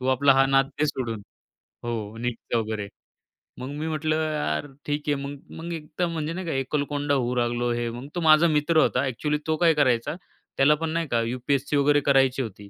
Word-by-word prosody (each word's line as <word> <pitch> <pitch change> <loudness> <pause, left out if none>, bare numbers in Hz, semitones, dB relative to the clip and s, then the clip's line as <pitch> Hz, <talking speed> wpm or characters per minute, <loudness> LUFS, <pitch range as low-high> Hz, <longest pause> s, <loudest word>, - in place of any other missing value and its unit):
तू 130 - -3
आपला 135 +1 +4
हा 135 0 +5
नाद 135 0 +3
दे 155 - +2
सोडून 115 -7 -3 0.6
हो 115 -2 -4
नीटचा 120 0 -2
वगैरे." 110 -2 -3 0.7
मग 130 +2 -5
मी 150 +2 -4
म्हटलं 155 0 0 0.2
यार 145 - -1 0.2
ठीक 145 0 -2
आहे. 145 - +2
मग-मग 145 +4 -7
एक 155 -2 -6
तर 175 - +3
म्हणजे 165 -1 -3
नाही 185 0 -5
का 160 - -1
एकलकोंडा 145 +1 -1
होऊ 125 -2 0
लागलो 120 0 0
हे 120 0 -1
मग 120 +4 -7
तो 175 - -1
माझा 155 +1 +6
मित्र 155 +1 +2
होता - - +3
ॲक्चुअली 150 +4 -1
तो 160 - +2
काय 170 -2 +4
करायचा 130 -1 +1 0.4
त्याला 145 +3 +5
पण 165 +1 -3
नाही 165 0 -1
का, 120 -2 +1
यूपीएससी 130 +4 -1
वगैरे 145 +1 +4
करायची 135 -1 +3
होती. 100 -3 -7
140 Hz, 200 wpm, -25 LUFS, 120-150 Hz, 0.7 s, माझा